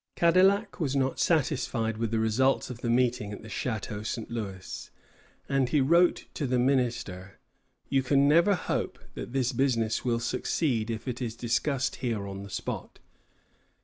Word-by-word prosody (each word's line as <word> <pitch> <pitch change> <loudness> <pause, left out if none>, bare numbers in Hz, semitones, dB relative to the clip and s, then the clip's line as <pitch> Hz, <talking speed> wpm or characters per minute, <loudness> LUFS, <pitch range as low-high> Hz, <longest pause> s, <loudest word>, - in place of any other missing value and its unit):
Cadillac 190 +5 +3
was 140 -5 -1
not 135 -1 0
satisfied 130 -8 +1
with 115 -1 0
the 115 - 0
results 115 +5 +2
of 120 - -8
the 120 - -2
meeting 120 -3 +1
at 105 - -8
the 110 - -10
Château 110 -1 -3
St. 115 +1 -4
Louis, 100 -5 -6 0.6
and 135 -2 +1
he 150 - +3
wrote 170 +6 +4
to 145 - -2
the 125 0 +1
minister: 120 -7 0 0.5
"You 135 - +2
can 140 +2 +3
never 170 +7 +5
hope - - -2 0.2
that - - -7
this 130 -1 +1
business 115 -4 +1
will 120 -2 +1
succeed 120 0 -1
if 115 +2 -4
it 125 0 -3
is 115 -2 -3
discussed 130 +3 0
here 115 -5 -2
on 100 0 -6
the 100 - -9
spot. 100 - -5
125 Hz, 165 wpm, -28 LUFS, 110-140 Hz, 0.6 s, never